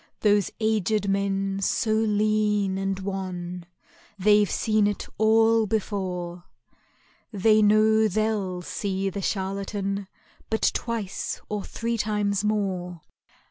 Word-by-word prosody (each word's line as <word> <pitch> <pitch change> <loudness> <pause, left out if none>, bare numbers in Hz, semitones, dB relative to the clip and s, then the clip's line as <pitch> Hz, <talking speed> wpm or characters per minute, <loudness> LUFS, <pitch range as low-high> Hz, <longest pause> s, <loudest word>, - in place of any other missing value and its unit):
Those 205 -2 +3
aged 215 -2 +1
men 195 0 0
so 215 +3 +1
lean 210 -2 +1
and 195 0 -2
wan, 180 -2 -5 0.5
They've 205 +1 +4
seen 215 -2 +2
it 205 - -3
all 225 0 +4
before, 180 -4 -3 0.9
They 215 +1 +4
know 215 +1 +4
they'll 205 -3 -1
see 195 +1 -2
the 200 - -4
charlatan 195 0 -2 0.4
But 220 - +2
twice 225 -5 -3
or 210 -1 -3
three 230 0 -3
times 210 -1 0
more. 185 -5 -2
205 Hz, 105 wpm, -25 LUFS, 195-215 Hz, 0.9 s, They've